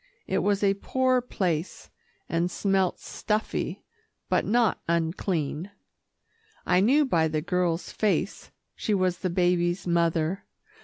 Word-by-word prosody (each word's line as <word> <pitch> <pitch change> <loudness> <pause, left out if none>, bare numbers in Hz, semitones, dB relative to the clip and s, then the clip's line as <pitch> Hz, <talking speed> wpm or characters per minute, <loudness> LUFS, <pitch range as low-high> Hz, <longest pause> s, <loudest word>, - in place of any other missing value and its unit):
It - - 0
was 205 0 +1
a 195 -1 +4
poor 260 -1 +2
place, 180 -8 -3 0.4
and 170 +1 0
smelt 190 -1 0
stuffy, 215 0 -3 0.5
but - - +2
not 235 -1 +2
unclean. 165 0 -1 1.0
I 180 0 +3
knew 270 +10 +4
by 165 -11 +2
the 155 -1 -1
girl's 175 -1 -1
face 215 -2 -1 0.3
she 210 - 0
was 185 -2 0
the 185 - -1
baby's 175 0 +1
mother. 170 +1 +1
180 Hz, 120 wpm, -26 LUFS, 170-205 Hz, 1.0 s, a